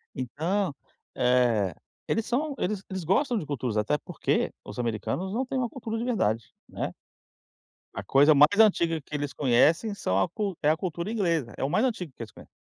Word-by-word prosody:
Então, 160 - -1 0.4
eh, 120 -7 +2 0.3
eles 225 -1 0
são, 285 +4 0
eles 205 -2 -2
eles 190 -2 -3
gostam 240 - +2
de 155 - -6
culturas, 125 -6 -3
até 110 +8 +1
porque - - -1
os 105 - -10
americanos 120 - -2
não 255 +4 0
têm 270 - -2
uma 250 -2 0
cultura 225 -3 -5
de 230 - -2
verdade, 115 - 0 0.2
né. - - -4 1.0
A 100 - -4
coisa 140 +8 +5
mais 150 +9 +5
antiga 170 -7 +4
que 150 - -11
eles 145 -1 -2
conhecem 155 - +3
são 95 - 0
a - - 0 0.3
é 150 - +4
a 160 - +3
cultura 170 +2 -4
inglesa, 170 - 0
é - - -2
o 140 - -1
mais 180 - +2
antigo 185 - -2
que - - -9
eles 110 - -8
conhecem. - - -16
160 Hz, 190 wpm, -27 LUFS, 125-210 Hz, 1.0 s, coisa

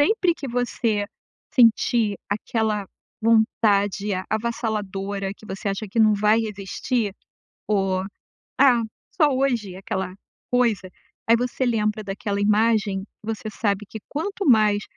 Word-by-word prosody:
sempre 370 +2 +3
que 285 - -7
você 235 -3 0 0.5
sentir 230 -4 +4
aquela 215 -1 -1 0.4
vontade 210 -2 +2 0.2
avassaladora 205 -4 -2
que - - -17
você 195 0 -4
acha 200 +2 -3
que 230 - -3
não 215 -1 +5
vai 210 +2 +3
resistir, 210 +1 -2 0.6
ou, 195 -3 +1 0.6
ah, 255 -4 +6 0.4
"só 300 - +7
hoje, 245 -8 0
aquela 190 -1 -4 0.4
coisa," 230 -7 +1 0.4
aí 230 - +7
você 250 +2 -1
lembra 215 -2 0
daquela 200 0 -3
imagem, 210 -2 +2 0.2
você 220 0 -4
sabe 205 -2 -1
que 220 - -7
quanto 385 +6 -3
mais 215 -4 +4
215 Hz, 120 wpm, -23 LUFS, 200-235 Hz, 0.6 s, só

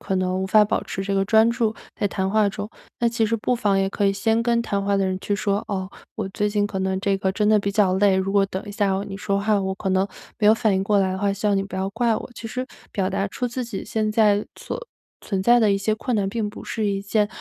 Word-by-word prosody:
可 190 - -2
能 185 0 0
无 - - 0
法 210 +3 +5
保 210 - -1
持 195 - -5
这 200 - -1
个 195 0 +2
专 220 +2 +5
注， 235 -2 +1 0.2
在 205 - -1
谈 190 -1 -1
话 210 0 +3
中。 205 +1 -5 0.3
那 235 - +2
其 230 -1 0
实 230 +2 +1
不 245 +3 0
妨 205 -4 +1
也 195 0 +1
可 200 +1 -1
以 195 - +4
先 225 +3 +1
跟 235 0 +2
谈 200 -3 -1
话 200 0 +2
的 195 -1 +1
人 185 - -1
去 205 - -3
说： 205 +1 -1
“哦， 190 -2 -3 0.3
我 200 - -3
最 210 +1 0
近 205 -1 +1
可 195 -2 -4
能 190 0 0
这 195 0 +1
个 190 0 0
真 210 +2 +1
的 215 - +5
比 200 - -1
较 195 -2 +3
累， 195 0 +4
如 190 +1 -1
果 200 -1 +4
等 190 -1 -4
一 205 - -7
下 200 -2 +1
你 195 - -6
说 200 0 -1
话， 205 0 +2
我 190 0 -1
可 195 - -2
能 190 +1 +2 0.3
没 210 - +3
有 - - +8
反 215 -2 +2
应 190 - +1
过 205 +1 +2
来 190 -1 +1
的 190 - -3
话， 200 0 +1
希 200 +2 -3
望 205 -1 +3
你 195 - +1
不 195 -1 -7
要 190 +1 -1
怪 230 +2 +1
我。” - - -6
其 225 - -7
实 255 +3 -4 0.2
表 190 -3 -1
达 195 +1 -1
出 245 - -3
自 245 +1 -4
己 235 - -6
现 215 -1 -1
在 210 -1 +3 0.2
所 - - -6 0.3
存 190 -2 -2
在 240 +3 +5
的 215 -3 +4
一 195 - +1
些 215 +2 0
困 240 +3 -3
难， 200 -3 +1
并 210 0 -2
不 - - -10
是 220 - -3
一 195 -1 0
件， 205 +1 +1
205 Hz, 315 characters per minute, -23 LUFS, 195-220 Hz, 0.3 s, 有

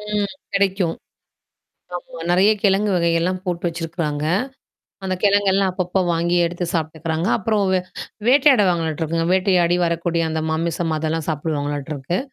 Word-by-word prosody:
ம். 205 -1 0 0.2
கெடைக்கும். 190 -4 +1 1.0
ஆமா - - -10
நெறைய 185 +4 +5
கெழங்கு 200 +1 +2
வகைகள்ல்லாம் 170 +2 +1
போட்டு 175 -1 -3
வச்சிருக்கறாங்க. 165 -3 -3 0.8
அந்த 185 0 -1
கெழங்கல்லாம் 200 -1 +3
அப்பப்போ 185 +1 -1
வாங்கி 170 +1 0
எடுத்து 175 +1 -3
சாப்பிட்டுக்குறாங்க. 160 +1 -2
அப்புறம் 215 0 0
வே 185 - +3 0.5
வேட்டையாடுவாங்களட்டுருக்குங்க. 170 - +3
வேட்டைய 185 -1 +3
ஆடி 175 +1 +2
வரக்கூடிய 170 0 0
அந்த 160 0 -2
மாமிசம் 165 0 -1
அதெல்லாம் 160 0 -2
சாப்பிடுவாங்களட்டுருக்கு. 145 0 -2
175 Hz, 115 wpm, -21 LUFS, 160-190 Hz, 1.0 s, நெறைய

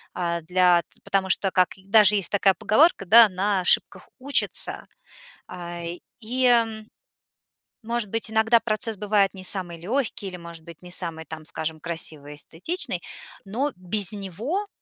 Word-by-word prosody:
э, 170 -1 -3
для 180 0 +2 0.2
потому 195 -1 -1
что 190 +1 +1
как 185 -1 +2 0.2
даже 210 0 +5
есть 200 -3 -1
такая 195 -1 +3
поговорка, 285 - +2
да, 225 +4 +8
"на 195 +1 -1
ошибках 180 - 0
учатся". 275 +2 0 0.6
А, 175 -1 -8 0.4
и, 250 +3 -2
м 225 -3 +1 0.9
может 230 -2 -3
быть, 225 +1 -2
иногда 220 +1 +3
процесс 220 0 0
бывает 205 -1 +1
не 190 -1 -10
самый 180 -3 +4
легкий 220 +2 -3
или, 180 -1 -7
может 170 -1 -12
быть, 165 -1 -14
не 180 - -11
самый 165 -3 -1
там, 155 +1 -10
скажем, 160 +1 -4
красивый 155 -3 -5
и - - -12
эстетичный, 185 - -3 0.4
но 255 +9 -2
без 185 +2 0
него 215 - -5
195 Hz, 150 wpm, -23 LUFS, 175-220 Hz, 0.9 s, да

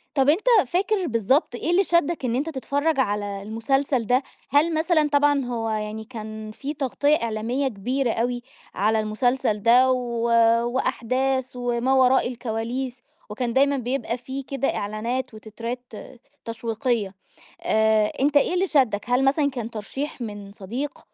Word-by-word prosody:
طب، 270 -1 +3
أنت 360 +11 +2 0.2
فاكر 380 - 0
بالضبط 245 - +1
إيه 320 - -2
اللي 370 +3 +4
شدّك 340 -5 +1
إن 235 -1 0
أنت 285 +6 -1
تتفرّج 285 +1 -1
على 205 -4 -1
المسلسل 235 +4 0
ده؟ 255 +4 +3 0.3
هل 305 +4 +3
مثلًا 315 -1 +2
طبعًا 285 -2 +3
هو 230 -2 -3
يعني 215 0 -3
كان 215 -2 -7
في 280 +6 -5
تغطية 285 +1 +1
إعلامية 230 +5 -1
كبيرة 250 +3 -1
أوي 245 +2 -1 0.3
على 215 +3 +2
المسلسل 215 0 0
ده 250 +3 +5
و 240 -2 -1 0.5
وأحداث 260 +1 0
وما 245 +1 0
وراء 260 -1 +4
الكواليس، 245 +1 -4 0.3
وكان 235 +3 -3
دايمًا 280 +2 +3
بيبقى 245 -1 -2
في 265 +2 -6
كده 275 +1 -2
إعلانات 230 +5 -3
وتترات 230 +3 -7 0.5
تشويقية. 230 -2 -2 0.5
آآ، 220 -1 +2
أنت 285 +2 +3
إيه 290 - +2
اللي 365 +2 +1
شدك؟ 245 - +1
هل 250 +2 +3
مثلًا 285 +1 +3
كان 240 -4 -5
ترشيح 250 +6 -6
من 205 -3 -6
صديق 235 +8 -5
250 Hz, 145 wpm, -24 LUFS, 225-275 Hz, 0.5 s, ده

